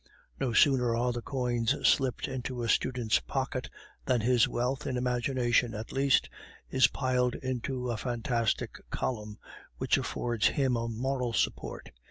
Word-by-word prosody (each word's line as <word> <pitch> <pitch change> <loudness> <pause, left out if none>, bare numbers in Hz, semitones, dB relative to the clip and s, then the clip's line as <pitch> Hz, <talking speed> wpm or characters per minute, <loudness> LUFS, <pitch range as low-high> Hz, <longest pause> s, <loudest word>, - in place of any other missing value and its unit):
No 130 -3 0
sooner 125 -1 +4
are 120 +1 +1
the 120 - -4
coins 125 -1 0
slipped 130 -3 +2
into 125 -2 -4
a 115 - -2
student's 120 -4 +2
pocket 130 -1 -3 0.4
than 125 -3 +2
his 120 0 +4
wealth, 130 +4 -2
in 130 -2 -1
imagination 125 -1 +1
at 110 +2 -6
least, 135 -2 +3 0.4
is 130 0 +5
piled 125 -2 0
into 125 -1 -3
a 115 - -2
fantastic 115 -1 -1
column, 105 -4 -3 0.4
which - - +2
affords 120 -2 0
him 135 -3 +1
a 115 0 -1
moral 125 +1 -2
support. - - -2
125 Hz, 145 wpm, -30 LUFS, 115-130 Hz, 0.4 s, is